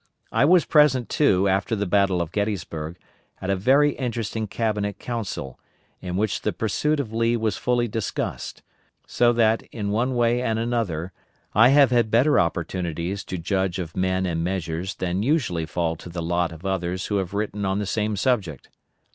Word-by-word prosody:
I - - +3
was 175 +2 +5
present, 145 -6 +4
too, 100 -10 +3
after 100 +4 +1
the 100 -1 -1
Battle 95 -2 +2
of 80 - -9
Gettysburg, 85 -5 -3 0.4
at 95 - -2
a - - +2
very 135 +9 +4
interesting 115 -4 -3
Cabinet 105 -2 -2
Council, 105 - -5 0.4
in 90 -1 -4
which 105 -1 0
the - - 0
pursuit 150 +8 0
of 115 -6 -4
Lee 115 +1 +2
was 110 -2 -1
fully 120 -1 +1
discussed; 110 -1 -4 0.4
so 120 -1 +3
that, 115 -1 +3
in 100 -3 -3
one 125 +5 0
way 120 0 +2
and 115 -3 0
another, 110 -8 -2 0.4
I 115 +4 +6
have 140 -2 +5
had 120 -2 +3
better 125 +7 +4
opportunities 85 +2 -2
to 95 - -4
judge 95 +1 -1
of 85 -3 -5
men 95 0 0
and 85 -2 -1
measures 90 0 -3
than 90 +1 -2
usually 110 - 0
fall 85 +1 -1
to 85 - -10
the 85 0 -5
lot 85 0 0
of 80 +3 -11
others 90 -1 -2
who 105 - -1
have 95 0 -3
written 105 0 -2
on 95 0 0
the 105 - -1
same 105 +2 -1
subject. 100 - -1
100 Hz, 180 wpm, -24 LUFS, 90-115 Hz, 0.4 s, I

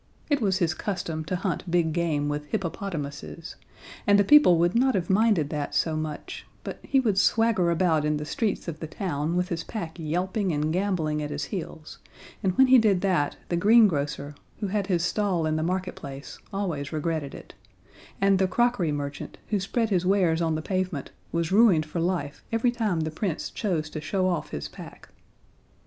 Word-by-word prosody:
It 285 -2 +2
was 195 -3 +2
his 170 -3 +1
custom 165 -4 -3
to 185 - -2
hunt 185 -1 -3
big 170 -2 +2
game 155 -4 0
with 150 0 -3
hippopotamuses, 165 -3 -5 0.5
and 205 -1 +5
people 295 - +7
would 170 +2 +2
not 255 +1 +3
have 180 -1 0
minded 195 -7 +3
that 150 -2 -3
so 160 -1 +1
much 155 -1 -5 0.2
but - - -6
he 270 - +2
would 215 -7 +2
swagger 225 -4 +3
about 170 -3 +2
in 150 0 +1
the 150 - -5
streets 210 +5 -2
of 160 -2 -5
the 160 - -5
town 160 -1 -2
with 180 +1 0
his 165 -1 -3
pack 170 -6 -6
yelping 180 +5 -1
and 155 +1 0
gamboling 170 -5 0
at 150 - -3
his 145 0 -3
heels, 160 -2 -7 0.4
and 185 -2 0
when 265 - +7
he 260 -1 +7
did 205 -5 +3
that, 180 -7 +1
the 175 - 0
green 215 +5 +6
grocer, 145 -3 -3 0.3
who 205 -3 -2
had 200 -1 -1
his 175 -4 +1
stall 190 -5 0
in 155 0 0
the 155 - 0
marketplace, 175 -6 -4
always 175 -9 -3
regretted 155 -2 -2
it; - - -12 0.7
and 195 -1 +3
the 190 - +3
crockery 220 -4 +1
merchant, 145 -1 -5
who 210 - +1
spread 220 +3 -1
his 185 -2 +2
wares 180 -3 +2
on 160 -1 +1
the 155 - -3
pavement, 185 -6 -2 0.2
was 170 0 -1
ruined 195 -7 +5
for 155 +3 -4
life 170 -5 -2
every 230 +2 +2
time 215 -8 -1
the 155 0 -2
Prince 165 0 -3
chose 170 -7 -1
to 155 0 -6
show 185 +5 0
off 170 -5 -1
his 75 - -5
pack. - - -12
175 Hz, 190 wpm, -26 LUFS, 155-195 Hz, 0.7 s, people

